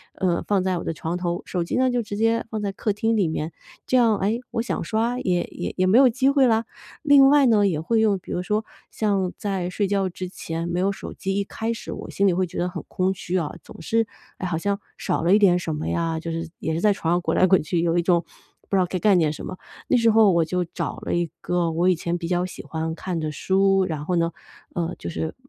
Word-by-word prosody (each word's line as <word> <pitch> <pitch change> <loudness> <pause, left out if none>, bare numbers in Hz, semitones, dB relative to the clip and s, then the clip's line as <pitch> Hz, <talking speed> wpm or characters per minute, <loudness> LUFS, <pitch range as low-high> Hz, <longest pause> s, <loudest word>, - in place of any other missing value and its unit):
呃， 180 -2 0
放 200 -2 +2
在 185 -1 +1
我 - - -4
的 - - -2
床 160 +2 -4
头， 175 -1 -2
手 180 -2 -2
机 170 - -2
呢 260 0 +3
就 245 -1 0
直 205 -1 -6
接 225 +1 +2
放 220 -1 -3
在 200 -1 -2
客 210 - -1
厅 225 +2 0
里 195 -6 +2
面， 160 0 -3 0.3
这 - - +1
样， 230 -4 +4
诶， 215 +5 0
我 230 - -1
想 240 - -3
刷 230 +3 0
也 175 -2 +1 0.3
也 185 0 +2
没 200 +5 +5
有 265 -1 +7
机 260 +3 +2
会 275 -1 +4
啦。 225 -1 +2 0.4
另 285 -2 +7
外 290 -1 +5
呢 215 -4 +4
也 175 -6 +1
会 220 +8 +1
用 205 -3 +2
比 - - -8
如 180 - -2
说 210 +3 -1 0.3
像 195 -4 0
在 190 -3 -2
睡 200 +2 -1
觉 195 -1 0
之 185 +1 -6
前 165 -2 -5
没 175 0 -2
有 195 +1 +2
手 195 - -7
机， 195 0 -3
一 200 - -1
开 225 +3 -3
始 230 - -7
我 - - -8
心 200 - +1
里 185 - +3
会 185 +2 +1
觉 170 - -9
得 175 - 0
很 180 -1 -6
空 185 +1 0
虚 185 -1 -3
啊， 160 -5 -2
总 - - -12
是， 225 +7 +1 0.3
哎， - - -3
好 175 -3 -1
像 200 +4 -1 0.2
少 - - -1
了 175 +3 +4
一 210 - +6
点 185 -4 +5
什 170 -2 -3
么 150 +1 -4
呀， 165 -1 -1
就 165 +1 -5
是 165 0 -4
也 160 - -2
是 165 - -2
在 210 - +4
床 170 -4 0
上 175 - +1
滚 - - -1
来 185 - +5
滚 190 -3 +4
去， 165 +3 -1
有 170 0 +1
一 - - +4
种 170 0 +2 0.5
不 - - 0
知 - - +4
道 185 - +3
该 180 +1 -3
干 200 0 +4
点 160 -3 +2
什 - - -8
么， 185 - -6 0.3
那 255 - +4
时 230 -1 +4
候 215 -2 +6
我 170 -2 +3
就 180 +2 -1
找 170 - -4
了 - - -3
一 175 -1 0
个 175 -2 0
我 170 +3 +2
以 185 - +4
前 170 +1 -2
比 170 -1 -5
较 180 0 +1
喜 185 - -8
欢 160 0 -3
看 180 -1 -4
的 155 -1 -2
书， 195 +5 +2
然 155 -4 -4
后 180 - 0
呢， 170 0 +1 0.4
呃， 170 -1 -2
就 - - -6
是 160 -1 -4
185 Hz, 290 characters per minute, -23 LUFS, 170-210 Hz, 0.5 s, 有